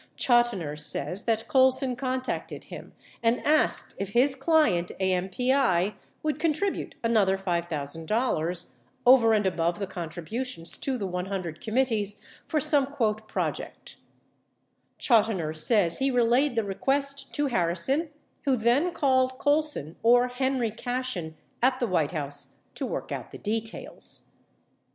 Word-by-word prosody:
Chotiner 240 - +2
says 150 +6 -2
that 225 -1 0
Colson 260 -2 +3
contacted 260 0 -3
him - - -10 0.3
and 230 +1 +2
asked 305 +1 +2
if 200 0 -4
his 260 +3 +4
client, 270 - +2
AMPI, 190 +2 +1 0.3
would 305 -1 -1
con 325 -2 +2
tribute 390 +6 -2
another 210 -5 +3
$5,000 170 - -1 0.2
— 260 0 -38
over 245 -3 +7
and 210 -2 +2
above 170 -2 0
the 200 - -2
contributions 175 +3 -4
to 265 -2 -1
the 205 - -3
100 180 -3 -4
committees 220 -3 0
— - - -25
for 310 - +1
some 285 -1 +2
"project." 220 -6 -3 1.0
Chotiner 205 - +2
says 170 +1 +2
he 270 +1 +2
relayed 245 +2 +2
the 225 - +1
request 275 +7 -2
to 295 - +1
Harrison 245 - 0 0.4
who 270 -2 +3
then 255 +10 +2
called 260 -4 +2
Colson 290 - 0
or 245 +2 +5
Henry 250 -2 0
Cashen 245 -9 -4 0.3
at 255 +1 +3
the 245 - +1
White 170 -8 +1
House 145 -2 -2
to - - -3
work - - -5
out - - -5
the - - -10
details. 220 +1 -3
230 Hz, 130 wpm, -27 LUFS, 180-260 Hz, 1.0 s, over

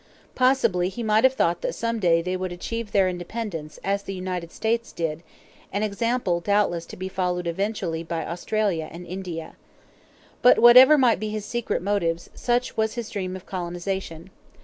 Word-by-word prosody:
Possibly 230 -9 +2
he 235 +5 -6
might 215 0 +3
have 260 0 +4
thought 170 -6 +1
that - - -2
some 230 0 -2
day 165 -4 +3
they 180 +1 -2
would 185 -1 -3
achieve 215 +5 -5
their 195 -2 +3
independence, 175 -3 -5
as 200 +1 0
the 195 -1 -6
United 180 -2 -4
States 230 +1 -1
did 165 -1 -3 0.5
an 200 +2 -1
example 215 -3 0
doubtless 175 -3 +1
to - - -10
be 185 +1 -4
followed 180 -1 -2
eventually 175 -2 -2
by 165 -1 -4
Australia 175 -1 -1
and 175 +2 -9
India. 175 -3 -6 0.9
But 250 - +7
whatever 255 +5 +9
might 250 -7 +4
be 215 +1 -3
his 210 -1 -4
secret 240 -4 -2
motives, 170 -4 -1
such 245 0 -1
was 220 +1 0
his 235 -2 -5
dream 185 -3 -3
of 185 - -9
colonization. 175 -1 -5
190 Hz, 170 wpm, -24 LUFS, 175-220 Hz, 0.9 s, whatever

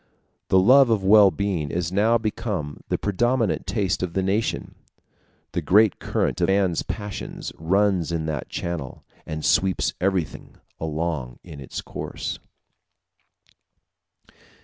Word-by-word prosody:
The 95 - +4
love 125 +7 +6
of 110 -4 +1
well 100 +1 +7
being 95 -7 -2
is 85 +2 -2
now 110 +5 +3
become 105 -9 -4
the - - +1
predominant 120 +2 0
taste 100 -6 0
of 90 -2 -3
the 95 - 0
nation; 100 +4 -1 0.8
the - - -2
great 105 +2 +4
current 90 - -1
of 85 - +3
man's 95 -3 +2
passions 105 -2 -6
runs 95 0 +1
in 80 -2 -2
that 75 -4 -4
channel, 85 -7 -5 0.2
and 80 0 -4
sweeps 95 -1 +2
everything 95 -4 -2 0.2
along 80 -6 -3
in 80 -5 -10
its 65 - -6
course. - - -6
95 Hz, 125 wpm, -24 LUFS, 80-105 Hz, 0.8 s, well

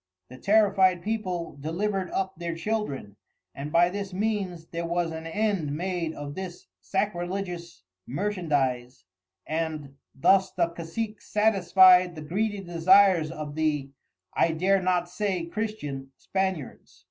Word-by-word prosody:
The 130 +1 -11
terrified 195 -3 +4
People 185 -8 -3
delivered 185 +5 -2
up 190 0 -2
their 170 0 -4
Children, 165 - -3 0.4
and 145 +2 -6
by 170 +2 +5
this 200 0 -5
means 190 -4 -2
there 170 0 -3
was 170 -1 0
an 160 0 -6
end 175 -6 -1
made 175 -2 -2
of 145 0 -6
this 185 +1 -7
Sacrilegious 180 - -3 0.2
Merchandize, 135 - -1 0.4
and 155 -3 -3 0.2
thus 190 +7 +4
the 170 -2 +1
Casic 175 +7 -5
satisfied 185 -4 +5
the 155 - -7
greedy 205 +6 -1
desires 180 -1 +4
of 155 -3 -6
the 150 -3 -1 0.4
(I 165 - +2
dare 190 +4 +2
not 180 -1 +1
say 185 -1 -2
Christian) 170 -10 -4
Spaniards. 190 -8 -3
175 Hz, 125 wpm, -27 LUFS, 160-195 Hz, 0.4 s, by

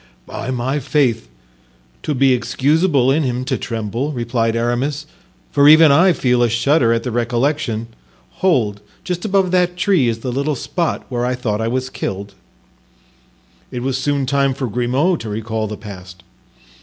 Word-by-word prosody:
"By - - -6
my 130 +3 -1
faith, 130 - 0 0.7
'twould 150 - -2
be 135 0 +4
excusable 140 +2 +2
in 150 +4 +2
him 125 -2 -2
to - - -1
tremble," 115 +5 -3
replied 115 -2 -1
Aramis, 125 +6 -1 0.5
"for 145 0 +5
even 155 0 +8
I 175 +7 +5
feel 125 -6 +1
a 120 - +3
shudder 120 +2 +2
at 115 0 0
the 125 - -3
recollection; 120 0 -1 0.6
hold, 115 - +1 0.2
just 180 0 -4
above 195 -3 +1
that 180 -1 +1
tree 180 -8 +2
is 115 -1 -2
the 125 - -3
little 140 +4 -1
spot 170 +6 -2
where 120 -2 -2
I 125 +1 0
thought 115 -4 -2
I 110 - -1
was 130 +2 -2
killed." 100 +1 -5 1.4
It 125 -1 -5
was 135 0 -1
soon 140 +1 0
time 140 0 +1
for 135 - -3
Grimaud 125 - 0
to 110 - -6
recall 110 +1 -3
the 105 0 -6
past. 90 -4 -11
130 Hz, 165 wpm, -18 LUFS, 115-145 Hz, 1.4 s, even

